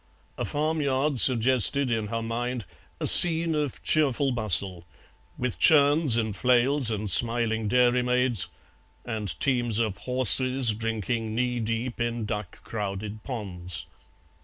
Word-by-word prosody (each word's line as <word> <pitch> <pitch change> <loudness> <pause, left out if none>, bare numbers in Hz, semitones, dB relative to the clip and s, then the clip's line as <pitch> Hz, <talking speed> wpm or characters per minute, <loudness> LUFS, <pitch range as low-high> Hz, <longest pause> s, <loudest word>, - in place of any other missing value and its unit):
A - - -5
farmyard 145 -3 -2
suggested 130 +2 +3
in 110 -2 -3
her 115 +2 -5
mind 120 0 -5 0.3
a - - -4
scene 165 -1 +8
of 150 -4 -5
cheerful 140 -3 0
bustle, 95 - 0 0.5
with 125 -2 -5
churns 145 -4 +3
and 110 -3 -3
flails 125 +2 +1
and 105 -1 -4
smiling 115 +1 +2
dairymaids, 125 -1 0 0.6
and 105 -9 -5
teams 120 -4 +1
of 110 -4 -2
horses 130 +1 0
drinking 110 0 -5
knee 125 0 -3
deep 115 +2 -5
in 120 -1 -4
duck 105 -3 -8
crowded 105 0 -7
ponds. 95 - -7
120 Hz, 120 wpm, -24 LUFS, 110-130 Hz, 0.6 s, scene